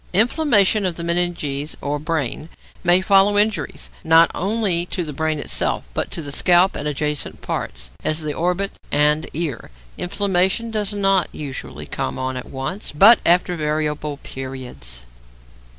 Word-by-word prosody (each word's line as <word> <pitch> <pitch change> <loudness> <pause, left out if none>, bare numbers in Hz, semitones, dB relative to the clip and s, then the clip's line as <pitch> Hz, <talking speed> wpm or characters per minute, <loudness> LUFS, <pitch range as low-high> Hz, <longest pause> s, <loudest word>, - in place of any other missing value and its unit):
Inflammation 215 - +3
of 180 -3 -1
the 170 - -6
meninges 170 -4 -1
or 145 +1 -2
brain 155 -1 -3 0.3
may 175 +1 +5
follow 195 +1 +4
injuries, 210 0 -1
not 165 +1 +5
only 195 -4 0
to 180 - -3
the 150 -2 -6
brain 155 +2 -1
itself, 145 - -1
but - - -2
to 165 - -4
the 145 - -5
scalp 180 +5 +4
and 145 - -3
adjacent 150 0 -3
parts, - - -4
as 155 +1 +2
the 150 -1 -3
orbit 180 +5 -1 0.2
and 150 +2 +2
ear. 155 -5 -3 0.3
Inflammation 190 +4 +1
does 210 -2 -1
not 195 -3 +2
usually 140 -3 -7
come - - -4
on 130 0 -3
at 125 - -7
once, 135 +10 -4
but 205 +10 +7
after 175 +1 +4
variable 150 -1 -2
periods. 130 - -6
165 Hz, 150 wpm, -21 LUFS, 150-195 Hz, 0.3 s, but